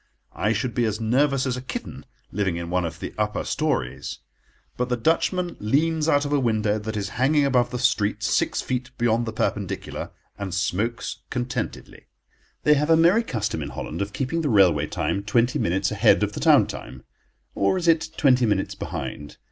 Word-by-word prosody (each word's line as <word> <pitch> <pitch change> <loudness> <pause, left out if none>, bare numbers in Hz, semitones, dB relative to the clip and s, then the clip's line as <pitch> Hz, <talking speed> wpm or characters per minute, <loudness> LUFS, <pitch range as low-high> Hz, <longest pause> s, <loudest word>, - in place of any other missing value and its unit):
I 105 - 0
should 115 +2 -1
be 120 - +1
as 110 0 -1
nervous 135 +4 +2
as 130 -2 -1
a 125 - -5
kitten, 130 - -7 0.2
living 95 -4 -1
in 85 0 -5
one 90 -1 +1
of 80 0 -6
the - - -6
upper 105 0 -1
storeys. 135 - -2 0.6
But 125 0 -2
the 125 - 0
Dutchman 170 +7 0
leans 155 +8 +1
out 145 -1 +3
of 145 - -2
a 145 - +3
window 110 -4 +1
that 110 +1 -4
is 100 -1 -2
hanging 145 +2 +4
above 125 -3 +2
the 125 - -4
street 105 -4 +1
six - - +1
feet 130 0 -3
beyond 120 0 +1
the - - -2
perpendicular, 110 - -3 0.3
and 95 -3 -4
smokes 105 +5 -2
contentedly. 125 -2 -4 0.6
They 150 - +6
have 150 +2 +1
a 165 - +6
merry 175 +7 +5
custom 110 - -3
in 70 - -4
Holland 75 +5 -5
of 100 +1 -2
keeping 135 +8 -2
the 150 - 0
railway 90 - +4
time 100 - -1
twenty 115 +4 +1
minutes 90 +3 0
ahead - - +4
of - - -1
the - - -5
town - - +5
time—or 65 - -5
is 175 -2 -2
it 160 -1 +3
twenty 130 -4 +4
minutes 100 -2 0
behind? 75 0 -6
120 Hz, 190 wpm, -24 LUFS, 100-140 Hz, 0.6 s, They